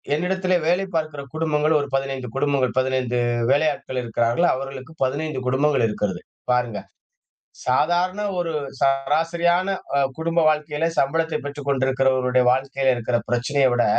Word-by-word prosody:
என்னிடத்தில 185 +2 +1
வேலை 180 +3 +2
பார்க்கிற 155 -3 -3
குடும்பங்கள் 155 -1 +2
ஒரு 145 - -5
15 135 -2 -2
குடும்பங்கள், 140 -3 +1
15 130 -2 0 0.3
வேலையாட்கள் 145 -3 0
இருக்கிறார்கள். 120 +7 +1
அவர்களுக்கு 135 +3 -7
15 140 +1 -3
குடும்பங்கள் 135 -1 +2
இருக்கிறது. 105 -4 -3 0.3
பாருங்க. 120 -3 -1 0.9
சாதாரண 175 +9 +1 0.2
ஒரு 170 -1 -2 0.3
சராசரியான 165 +6 +1 0.3
அ - - +4 0.2
குடும்ப 165 +1 +1
வாழ்க்கையில 150 +1 0
சம்பளத்தை 160 +4 +1
பெற்றுக் 145 0 -6
கொண்டிருக்கிறவருடைய 130 -1 +2
வாழ்க்கையில 135 0 +1
இருக்கிற 120 0 -1
பிரச்சனைய 130 +3 +2
விட 120 - +2
140 Hz, 120 wpm, -22 LUFS, 130-160 Hz, 0.9 s, அ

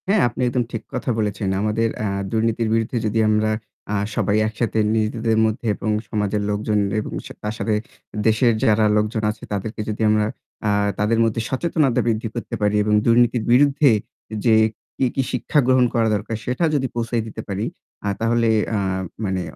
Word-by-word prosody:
হ্যাঁ, 200 -1 +4
আপনি 120 - -6
একদম 125 0 +1
ঠিক 115 - -4
কথা - - -3
বলেছেন। 105 -1 -1
আমাদের 110 +2 +1
অ্যা 110 - -1 0.2
দুর্নীতির 115 0 0
বিরুদ্ধে 115 +2 0
যদি 110 +1 0
আমরা 110 0 +2 0.4
আ - - +1 0.2
সবাই 105 0 +1
একসাথে 110 0 -1 0.2
নিজেদের 110 +1 0
মধ্যে 110 +2 -2
এবং 110 - -2 0.2
সমাজের 105 -1 -1
লোকজন 105 +1 0 0.2
এবং - - -7
সে - - -9
তার 105 +1 -2
সাথে 105 +2 0 0.5
দেশের 115 +2 +4
যারা 110 0 +4
লোকজন 110 +1 0
আছে - - -14
তাদেরকে 105 +2 -3
যদি 105 +1 -4
আমরা 105 0 +3 0.4
আ - - +3 0.3
তাদের 110 +2 +2
মধ্যে 115 0 0
সচেতনতা 140 -2 +1
বৃদ্ধি 115 0 0
করতে 120 0 -4
পারি 105 0 +2
এবং 105 0 +1
দুর্নীতির 120 0 +3
বিরুদ্ধে 140 +3 +5 0.6
যে 115 -2 +5 0.4
কি, 135 - +2
কি 135 - +2
শিক্ষা 130 +4 +1
গ্রহণ 130 -1 +5
করা 115 -2 +2
দরকার 110 +2 -3
সেটা 125 +7 -1
যদি 135 -2 +1
পৌঁছায় 115 0 -1
দিতে 110 - -7
পারি 100 +2 -2 0.4
আ - - 0
তাহলে 115 +1 +2 0.3
আ - - +1 0.5
মানে 95 -1 -1
110 Hz, 175 wpm, -21 LUFS, 105-120 Hz, 0.6 s, বিরুদ্ধে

